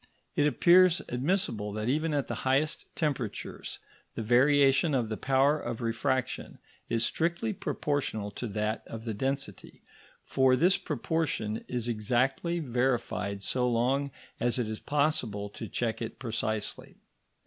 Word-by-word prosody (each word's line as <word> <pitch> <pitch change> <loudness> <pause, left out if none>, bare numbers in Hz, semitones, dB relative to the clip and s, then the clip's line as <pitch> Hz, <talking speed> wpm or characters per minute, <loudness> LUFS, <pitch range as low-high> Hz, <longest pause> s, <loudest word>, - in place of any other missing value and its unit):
It 145 - +4
appears 180 +3 +5
admissible 125 - 0
that 110 +1 -3
even 155 +5 +1
at 145 -2 0
the - - -3
highest 135 +4 +1
temperatures 135 -9 -3 0.4
the 115 - -3
variation 140 +5 +4
of 120 -4 0
the 110 - -2
power 135 +5 +3
of 120 -3 -4
refraction 125 +2 -1 0.3
is 115 0 +1
strictly 170 +7 0
proportional 140 - -2
to 120 - -5
that 105 +1 -2
of 115 0 -7
the 115 - -2
density, 135 -2 -4 0.4
for 130 -1 +3
this 175 +9 +4
proportion 140 -6 -2
is 120 -2 -3
exactly 125 +9 0
verified 120 -7 -1
so 125 +4 +1
long 130 +4 +1 0.3
as 120 0 +1
it 120 -3 0
is 110 0 -4
possible 125 -9 0
to 110 - -7
check 115 -1 -2
it 115 - -5
precisely. 110 -3 -3
125 Hz, 135 wpm, -29 LUFS, 110-145 Hz, 0.4 s, appears